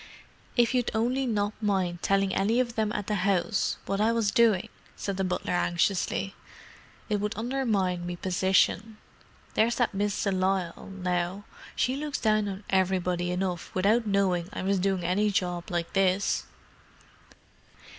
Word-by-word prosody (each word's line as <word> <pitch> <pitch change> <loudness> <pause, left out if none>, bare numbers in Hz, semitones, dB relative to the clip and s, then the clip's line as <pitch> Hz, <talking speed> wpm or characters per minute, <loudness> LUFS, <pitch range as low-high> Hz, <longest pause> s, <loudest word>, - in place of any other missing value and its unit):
"If 240 +1 +4
you'd 250 -2 +1
only 250 +4 +1
not 205 -2 0
mind 185 -4 0
telling 195 -1 +2
any 215 +5 +2
of 240 -2 0
them 220 -2 0
at 205 -1 -3
the 210 -1 -1
'ouse 195 +1 +1
what 195 +1 -1
I 220 +2 +3
was 230 -3 +1
doing," 220 -5 +3 0.3
said 200 - -3
the 190 - -1
butler 180 -1 -2
anxiously. 180 +2 0 0.7
"It 210 -1 0
'ud 210 +1 -1
undermine 210 -8 0
me 175 - -3
position. 190 +4 +1 0.6
There's 230 +2 +2
that 240 -4 +1
Miss 205 0 -1
de 200 - +1
Lisle, 185 -2 -1
now—she 185 +6 -3
looks 295 +1 -3
down 215 -1 +2
on 195 +1 -6
everybody 180 -2 +1
enough 180 -1 -2
without 215 +5 +2
knowin' 190 -3 +1
I - - -5
was 195 0 +1
doin' 190 -1 0
any 195 +5 +2
job 180 -3 -1
like 170 -1 -2
this." 195 - +2
195 Hz, 150 wpm, -28 LUFS, 180-215 Hz, 0.7 s, If